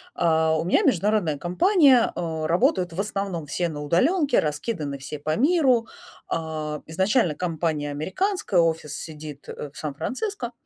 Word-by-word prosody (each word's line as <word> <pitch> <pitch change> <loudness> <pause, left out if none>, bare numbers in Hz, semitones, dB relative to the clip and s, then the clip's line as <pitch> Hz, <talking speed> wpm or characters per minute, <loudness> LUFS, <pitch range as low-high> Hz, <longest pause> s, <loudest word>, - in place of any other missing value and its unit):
Э, 160 -1 +2
у - - -1
меня 180 - +3
международная 185 -5 +1
компания, 270 - +4
э, 160 -2 -3
работают 175 +1 +1
в 170 - -6
основном 195 -6 -3
все 170 +4 -1
на 150 -2 -6
удалёнке, 270 - +2
раскиданы 150 -2 -3
все 145 +2 -6
по 155 +2 -1
миру. 265 -5 +3 0.4
А, 155 -2 -3
изначально 190 - +1
компания 160 -4 -2
американская, 190 - -1
офис 160 -3 0
сидит, 150 -3 -9
э, 145 - -7
в - - -15
Сан-Франциско. 245 - -4
170 Hz, 140 wpm, -24 LUFS, 155-220 Hz, 0.4 s, компания